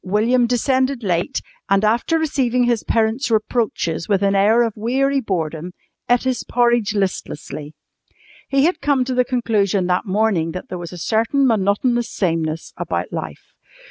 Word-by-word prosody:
William 230 +6 +2
descended 260 +2 +1
slightly 180 -6 +1
late, - - -4 0.3
and, 195 +2 +3
after 235 +9 +2
receiving 260 -6 +1
his 240 -2 +1
parents' 225 +5 0
reproaches 215 -7 -1
with 200 -1 +2
an 200 0 +3
air 210 +4 +4
of 230 -2 -1
weary 270 +5 +1
boredom, 170 -4 -3 0.4
ate 245 0 +3
his 260 -1 -1
porridge 235 -3 +1
listlessly. 155 -6 -4 0.7
He 275 +1 +3
had 345 0 0
come 280 -3 +2
to 260 - -2
the 250 0 +3
conclusion 215 -6 0
that 180 +3 0
morning 190 -5 +1
that 180 - -7
there 180 - -5
was 170 -1 -7
a 180 - -8
certain 225 - +1
monotonous 230 +2 +1
sameness 165 -3 -2
about - - -3
life. - - -7
220 Hz, 160 wpm, -20 LUFS, 190-250 Hz, 0.7 s, air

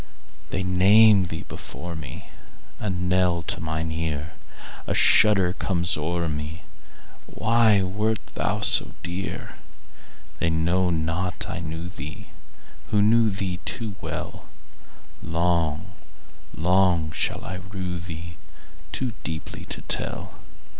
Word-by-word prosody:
They 95 - -1
name 100 +2 +6
thee 80 -1 -5
before 85 0 -7
me,A 80 +7 -9
knell 90 -1 +1
to - - -3
mine 80 0 -2
ear;A 80 -1 -5
shudder 95 -4 +5
comes 90 -3 0
o'er 85 +2 -1
me—Why 95 +7 -1
wert 105 +4 0 0.2
thou - - -1
so - - +5
dear? 90 +2 -5 0.8
They 85 - +1
know 85 +3 +2
not 85 +2 -1
I - - -4
knew 80 +1 -5
theeWho 75 -4 -8 0.7
knew 110 +2 +5
thee 95 -2 -3
too 110 -3 -3
well:Long, 85 -1 -4 0.7
long 90 -2 +3
shall - - -2
I 95 - -4
rue 90 -3 -4
theeToo 85 +8 -7
deeply 80 -1 -5
to - - -5
tell. - - 0
90 Hz, 100 wpm, -25 LUFS, 80-95 Hz, 0.8 s, name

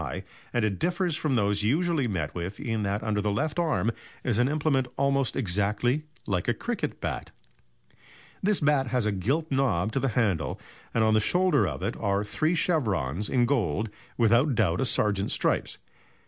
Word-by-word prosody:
high, - - -4 0.3
and 120 -2 +1
it 100 -3 -2
differs 175 -1 0
from 150 -4 0
those 105 -2 +1
usually 150 +4 +1
met 80 -8 -2
with 90 +3 -5
in 115 -6 -2
that 100 +1 -1
under 105 -1 0
the 105 - 0
left 145 +10 -1
arm 155 -9 +1 0.3
is 120 -3 +1
an 125 - +4
implement 145 -4 +1
almost 140 -2 +1
exactly 105 - +1 0.2
like 95 -4 -1
a - - +2
cricket - - -3
bat. - - -4 1.1
This 205 -1 +2
bat 145 -3 +3
has 125 -2 +1
a 105 - +2
gilt 135 - -1
knob 120 -8 +1
to 135 - 0
the 135 - 0
handle, 95 -10 +1 0.3
and 115 - +2
on 110 0 +3
the 110 - +5
shoulder 175 - +3
of 65 -5 -4
it - - -1
are 100 0 +1
three 155 +11 0
chevrons 105 - 0
in 125 -2 +3
gold, 110 - 0 0.3
without 120 +4 +4
doubt 85 -4 +2
a - - +2
sergeant's 105 -4 +1
stripes. - - 0
115 Hz, 180 wpm, -27 LUFS, 100-145 Hz, 1.1 s, the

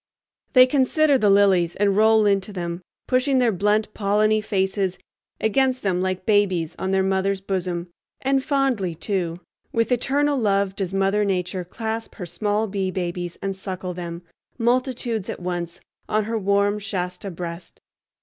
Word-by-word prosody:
They 255 -1 +9
consider 280 +2 +3
the 210 - +3
lilies 195 -4 +4
and 200 -1 +2
roll 220 0 +5
into 200 0 +1
them, 175 -2 -4 0.2
pushing 260 +1 +2
their 245 -3 +3
blunt 210 +3 +1
polleny 215 +1 +2
faces 190 -2 0 0.4
against 255 +3 +1
them 185 -3 +1
like 185 0 -2
babies 190 -6 +2
on 190 - -2
their 190 0 +2
mother's 190 +1 0
bosom; 180 -3 -3 0.3
and 270 0 +1
fondly, 260 - 0
too, 175 -1 -2 0.3
with 230 +2 0
eternal 280 +3 +1
love 200 -3 +1
does 190 -3 -2
Mother 195 +2 +2
Nature 185 -1 -1
clasp 225 +5 -5
her 185 - -6
small 205 +5 -1
bee 195 -2 -2
babies 175 -1 -4
and 195 0 -2
suckle 185 -1 -5
them, 170 -1 -6 0.3
multitudes 240 -3 0
at - - -4
once, 175 -1 -4 0.3
on 215 0 +2
her 225 +2 -3
warm 200 +1 +2
Shasta 185 -2 -4
breast. 170 -1 -7
200 Hz, 150 wpm, -23 LUFS, 185-220 Hz, 0.4 s, They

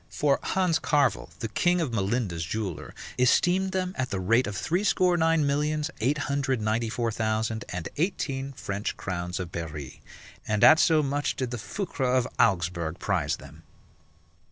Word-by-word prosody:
For 145 -2 +1
Hans 180 -4 +1
Carvel, 145 -2 +1
the 115 - -1
king 175 - +2
of 150 -8 -1
Melinda's 100 -4 -1
jeweller, 95 -1 -4 0.2
esteemed 180 +9 +3
them 185 0 -1
at 130 -1 -2
the 95 - -2
rate 115 +7 +2
of 105 -2 -4
threescore 180 - +2
nine 165 -2 +3
millions, 150 +2 0
eight 130 +7 +1
hundred 135 -3 0
ninety 110 +2 0
four 115 0 -1
thousand, 110 +1 -1
and 90 -2 -4
eighteen 140 -6 -1
French 100 -4 -4
crowns 90 -1 -4
of 90 -2 -5
Berry, 80 -5 -6 0.5
and 105 -1 +1
at 160 0 +8
so 155 -2 +4
much 145 +1 -1
did 130 -2 -3
the 120 - -4
Foucres 130 - -1
of 125 -1 +1
Augsburg 85 -5 +1
prize - - 0
them. - - -14
125 Hz, 160 wpm, -27 LUFS, 100-155 Hz, 0.5 s, at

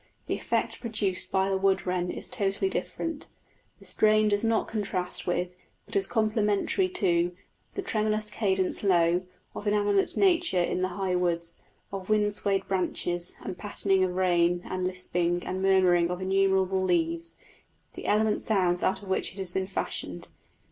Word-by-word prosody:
The - - -2
effect - - -1
produced 215 -5 -1
by 190 0 +2
the 190 - +1
wood 190 -1 +2
wren 180 -1 -1
is - - -5
totally 200 - 0
different; 325 -3 -3 0.5
the - - -17
strain 215 0 +3
does 205 +1 +1
not 225 -1 +1
contrast 190 -4 -2
with, 175 0 -1 0.3
but - - -10
is 395 0 +2
complementary 215 - +1
to, 175 - +1 0.4
the 395 - -3
"tremulous 215 -6 -1
cadence 190 -4 0
low" 180 -2 +2 0.3
of 205 - -6
inanimate 205 -1 +2
nature 350 - +3
in 180 +1 +1
the 185 - +2
high 190 -2 0
woods, 170 -1 -1 0.3
of 195 -1 -6
wind 210 -1 +2
swayed 195 -2 -1
branches 175 -2 -1
and 180 - -6
pattering 195 -2 +1
of 180 -1 -1
rain 175 -1 +2
and 185 0 -3
lisping 175 -1 -1
and 185 +1 -3
murmuring 185 -3 +4
of 180 0 -3
innumerable 190 0 +2
leaves 170 -2 0 0.6
the - - -7
elemental 215 0 +2
sounds 180 -5 +1
out 190 - 0
of - - -10
which 190 - 0
it - - -15
has 190 -2 -3
been 190 0 -1
fashioned. 195 - -4
190 Hz, 160 wpm, -28 LUFS, 180-210 Hz, 0.6 s, murmuring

